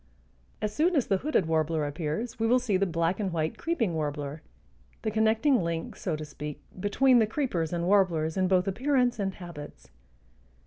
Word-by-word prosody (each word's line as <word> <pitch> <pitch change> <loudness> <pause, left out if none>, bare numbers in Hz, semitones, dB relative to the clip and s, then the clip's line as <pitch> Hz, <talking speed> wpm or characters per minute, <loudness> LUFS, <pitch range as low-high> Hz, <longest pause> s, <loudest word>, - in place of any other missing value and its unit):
As 210 0 -1
soon 335 +7 +2
as 275 - +3
the 195 - +2
hooded 270 - +1
warbler 160 -1 +1
appears 155 +11 -3
we 225 - +2
will 245 +2 +5
see 245 -5 0
the 195 +1 +2
black 170 +2 0
and 195 -3 -1
white 160 -1 -2
creeping 245 - 0
warbler, 145 -1 -3 0.6
the 215 - 0
connecting 220 +4 +3
link 165 -1 -3
(so 175 -5 -2
to 155 0 -6
speak) 150 0 -7 0.2
between 245 +6 +4
the 220 - +3
creepers 210 - -1
and 170 -1 -1
warblers 175 -5 +2
in 185 -1 +2
both 185 0 +2
appearance 250 +3 +1
and 195 -2 -1
habits. 165 -5 -10
185 Hz, 180 wpm, -28 LUFS, 160-225 Hz, 0.6 s, will